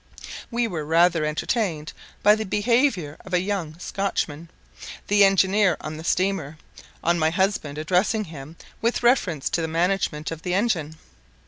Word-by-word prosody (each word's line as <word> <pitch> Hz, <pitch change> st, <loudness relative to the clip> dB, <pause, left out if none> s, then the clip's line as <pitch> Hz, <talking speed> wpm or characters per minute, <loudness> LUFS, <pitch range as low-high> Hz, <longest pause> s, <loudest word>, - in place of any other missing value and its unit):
We 235 Hz, -1 st, 0 dB
were 165 Hz, -7 st, -4 dB
rather 165 Hz, +1 st, +3 dB
entertained 155 Hz, 0 st, -2 dB, 0.3 s
by 210 Hz, -, +7 dB
the 220 Hz, +1 st, -1 dB
behaviour 210 Hz, -, +1 dB
of 185 Hz, -1 st, -3 dB
a -, -, +4 dB
young 180 Hz, -5 st, -3 dB
Scotchman, 170 Hz, -4 st, -3 dB, 0.6 s
the 205 Hz, 0 st, +5 dB
engineer 195 Hz, 0 st, +3 dB
of 155 Hz, 0 st, -6 dB
the 160 Hz, -, -8 dB
steamer, 175 Hz, -4 st, -1 dB, 0.5 s
on 170 Hz, +1 st, +2 dB
my 160 Hz, 0 st, +3 dB
husband 170 Hz, -5 st, -1 dB
addressing 185 Hz, +7 st, +1 dB
him 155 Hz, -3 st, -10 dB, 0.3 s
with 235 Hz, +2 st, 0 dB
reference 185 Hz, -, +2 dB
to 170 Hz, -, 0 dB
the 160 Hz, -, -1 dB
management 165 Hz, -2 st, -1 dB
of 165 Hz, -1 st, -6 dB
the 180 Hz, +1 st, -1 dB
engine. 180 Hz, -8 st, 0 dB
180 Hz, 150 wpm, -24 LUFS, 155-205 Hz, 0.6 s, by